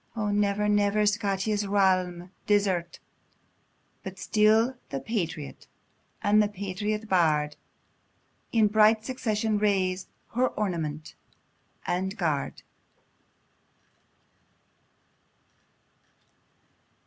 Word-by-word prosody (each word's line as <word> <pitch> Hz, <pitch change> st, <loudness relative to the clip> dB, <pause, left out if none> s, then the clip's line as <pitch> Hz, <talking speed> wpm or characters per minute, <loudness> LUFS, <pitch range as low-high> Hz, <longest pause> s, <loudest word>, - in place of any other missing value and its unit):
O 210 Hz, -2 st, -1 dB
never, 205 Hz, 0 st, +1 dB
never 205 Hz, 0 st, +2 dB
Scotia's 205 Hz, 0 st, 0 dB
realm 185 Hz, -3 st, +1 dB, 0.2 s
desert; 190 Hz, -5 st, +1 dB, 1.0 s
But -, -, -8 dB
still 220 Hz, +4 st, +3 dB
the 135 Hz, -, -3 dB
patriot, 165 Hz, -, -4 dB, 0.6 s
and 210 Hz, +1 st, +5 dB
the 210 Hz, -, +2 dB
patriot 205 Hz, +2 st, -4 dB
bard 155 Hz, -6 st, +2 dB, 1.0 s
In 225 Hz, -2 st, +4 dB
bright 215 Hz, +1 st, +4 dB
succession 220 Hz, -4 st, -1 dB
raise, 190 Hz, -3 st, +1 dB, 0.2 s
her 250 Hz, +2 st, +1 dB
ornament 160 Hz, -9 st, -3 dB, 0.7 s
and 190 Hz, +4 st, -2 dB
guard! 155 Hz, -7 st, -2 dB
205 Hz, 75 wpm, -27 LUFS, 185-215 Hz, 1.0 s, and